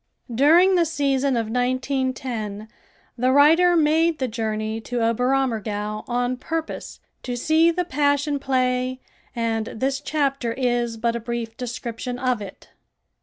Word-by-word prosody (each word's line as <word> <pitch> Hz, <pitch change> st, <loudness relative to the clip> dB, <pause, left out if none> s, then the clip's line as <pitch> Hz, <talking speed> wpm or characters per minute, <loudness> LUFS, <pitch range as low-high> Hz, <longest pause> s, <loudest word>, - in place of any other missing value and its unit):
During 330 Hz, +10 st, +5 dB
the 350 Hz, -2 st, +4 dB
season 280 Hz, -4 st, 0 dB
of 230 Hz, -, 0 dB
1910 250 Hz, -4 st, -2 dB, 0.5 s
the 255 Hz, +1 st, +3 dB
writer 325 Hz, +6 st, +5 dB
made 320 Hz, +1 st, +3 dB
the 260 Hz, -, -1 dB
journey 220 Hz, -1 st, -3 dB
to 245 Hz, +2 st, -3 dB
Oberammergau 225 Hz, -3 st, 0 dB
on 245 Hz, +1 st, 0 dB
purpose 320 Hz, +4 st, -5 dB, 0.2 s
to 245 Hz, -, -4 dB
see 315 Hz, +6 st, +3 dB
the 355 Hz, +1 st, -1 dB
Passion 285 Hz, 0 st, +1 dB
Play 255 Hz, -1 st, 0 dB, 0.4 s
and 225 Hz, -1 st, -1 dB
this 270 Hz, +4 st, -2 dB
chapter 275 Hz, -4 st, -1 dB
is 240 Hz, -2 st, -1 dB
but 230 Hz, +1 st, 0 dB
a -, -, -2 dB
brief 230 Hz, -1 st, -4 dB
description 245 Hz, 0 st, -5 dB
of 250 Hz, -3 st, 0 dB
it. 195 Hz, -2 st, -10 dB
255 Hz, 130 wpm, -23 LUFS, 230-285 Hz, 0.5 s, During